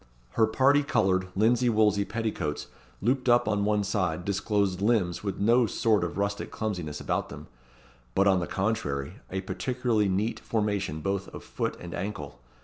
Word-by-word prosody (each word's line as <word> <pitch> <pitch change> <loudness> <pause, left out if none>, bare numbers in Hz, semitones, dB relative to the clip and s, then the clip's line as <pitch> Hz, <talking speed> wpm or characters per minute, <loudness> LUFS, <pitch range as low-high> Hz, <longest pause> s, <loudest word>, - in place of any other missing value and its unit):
Her 110 -1 +3
parti 135 +6 +4
coloured, 95 -10 +1
linsey 120 +4 +3
woolsey 105 -2 +3
petticoats 100 -8 -3 0.4
looped 130 +3 +1
up 120 -2 +4
on 105 -2 +1
one 105 -1 +2
side 90 -4 -1
disclosed 100 -1 0
limbs 100 -6 +1
with 100 -2 -3
no 115 +3 +4
sort 110 -4 +2
of 85 -1 -3
rustic 100 +1 -2
clumsiness 90 -9 -4
about - - -2
them; - - -9 0.7
but, 95 - +4
on 95 -2 +4
the 85 - -3
contrary, 95 -10 -2
a 95 0 -3
particularly 120 0 0
neat 100 +5 -1
formation 100 -8 -1
both 95 +2 -2
of - - -10
foot - - -3
and 85 -1 -8
ankle. 90 -11 -5
100 Hz, 160 wpm, -28 LUFS, 95-110 Hz, 0.7 s, parti